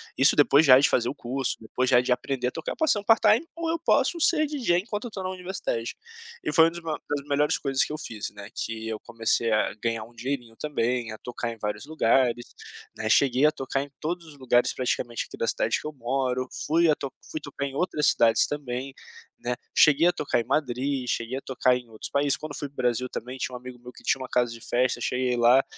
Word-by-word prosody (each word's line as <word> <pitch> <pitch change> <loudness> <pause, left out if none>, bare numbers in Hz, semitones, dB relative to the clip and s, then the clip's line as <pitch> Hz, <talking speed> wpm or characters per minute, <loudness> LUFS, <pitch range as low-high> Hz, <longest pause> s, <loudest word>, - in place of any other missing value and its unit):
isso 135 - +5
depois 145 +1 +6
já 130 -3 +8
de 145 - +5
fazer 120 -1 +1
o - - -5
curso, 130 +2 -2
depois 125 +3 -1
já 125 -1 +6
de 125 - -1
aprender 125 0 0
a - - -12
tocar, 160 - -5
"Posso 315 -2 +3
fazer 205 - -2
um - - -18
part-time 225 +6 +4
ou 335 0 -3
eu 330 0 0
posso 335 +1 +2
ser 315 -1 +4
DJ 255 -12 +1
enquanto 210 +2 -5
eu 235 - -6
tô 190 -3 -5
na 185 - -2
universidade". 180 -11 -4 0.5
E - - -2
foi 165 -1 +7
um - - +1
dos 170 0 -8
maio 160 -2 -3
uma 145 - -4
das - - -19
melhores 145 +1 +2
coisas 135 -2 +1
que - - -5
eu 155 - -3
fiz, 110 -9 -6
né, 100 -1 -10
que 110 0 -4
eu 110 -1 -3
comecei 115 0 0
a 110 0 +2
ganhar 115 -1 -1
um 120 +2 -15
dinheirinho 120 -1 -4
também, 125 -5 -1
a - - -8
tocar 120 0 -5
em 115 - -9
vários 105 +2 -4
lugares, 125 -5 +2 0.5
né, 110 0 -3
cheguei 130 +2 +4
a - - +3
tocar 135 -1 -2
em 145 - -7
todos 170 +2 -3
os 145 - -13
lugares 125 -2 +2
praticamente 120 -2 -2
aqui - - -10
da 115 - -1
cidade 110 - 0
que - - -6
eu 155 - -6
moro, 130 0 -1 0.2
fui 165 +2 +4
a - - +6
to 140 -3 -6 0.2
fui 155 - -3
tocar 140 -1 -5
em 140 - -5
outras 150 -1 0
cidades 115 -1 +4
também, 135 -2 -4 0.5
né, 120 0 -2 0.2
cheguei 155 +2 +6
a 175 - +5
tocar 140 -7 -1
em - - -5
Madrid, 135 0 -1
cheguei 120 +2 -2
a 135 - -5
tocar 125 -1 +2
em 125 -1 -6
outros 110 - -8
países. 140 0 +2
Quando 150 -2 -7
fui 145 - -4
para - - -32
o - - -34
Brasil 125 0 0
também 125 +2 -6
tinha 125 0 -3
um - - -6
amigo 125 0 -10
meu 125 +1 -11
que - - -16
tinha - - +1
uma 130 - -5
casa 120 -1 +1
de 115 - -9
festa, 125 +1 0
cheguei 125 0 0
lá, 120 +3 +5
130 Hz, 250 wpm, -26 LUFS, 120-150 Hz, 0.5 s, já